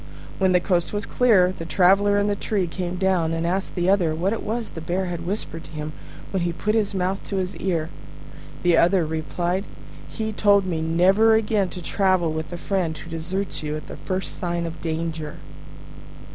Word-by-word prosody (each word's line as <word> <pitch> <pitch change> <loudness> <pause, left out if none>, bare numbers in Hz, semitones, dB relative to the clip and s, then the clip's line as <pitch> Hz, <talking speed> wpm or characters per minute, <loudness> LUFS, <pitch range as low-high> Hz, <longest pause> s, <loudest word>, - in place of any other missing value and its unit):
When 190 -1 +3
the 180 - +5
coast 175 -1 0
was 205 -1 -1
clear, 205 -8 +4
the 185 - -7
Traveller 195 +4 +4
in 205 - +2
the 205 0 +1
tree 200 -2 -1
came 175 +1 -4
down, 180 -3 +1
and 165 0 -1
asked 190 +3 -1
the 175 -1 0
other 180 -5 +3
what 185 +6 0
it 225 - -3
was 225 0 -3
the 165 - -7
Bear 180 +4 -1
had 170 -1 -5
whispered 175 -4 -4
to - - -13
him 155 0 -5 0.4
when 190 - 0
he 170 0 0
put 210 +5 -1
his 210 -3 +1
mouth 190 +1 -1
to 200 - -4
his 185 0 -2
ear. 170 -4 -1 0.8
The 175 -2 +4
other 175 0 +4
replied, 170 +4 -2 0.5
"He 220 -1 -3
told 200 -2 +4
me 165 -3 -2
never 190 +7 +4
again 210 -3 +1
to 180 -1 -8
travel 185 -4 +2
with 160 +1 -4
a 175 - -4
friend 175 -4 -1
who 160 - -10
deserts 180 +4 -3
you 150 0 -3
at 155 - -9
the - - -8
first 185 0 -3
sign 175 -1 -1
of 165 0 -7
danger." 160 -1 -3
180 Hz, 200 wpm, -24 LUFS, 165-195 Hz, 0.8 s, the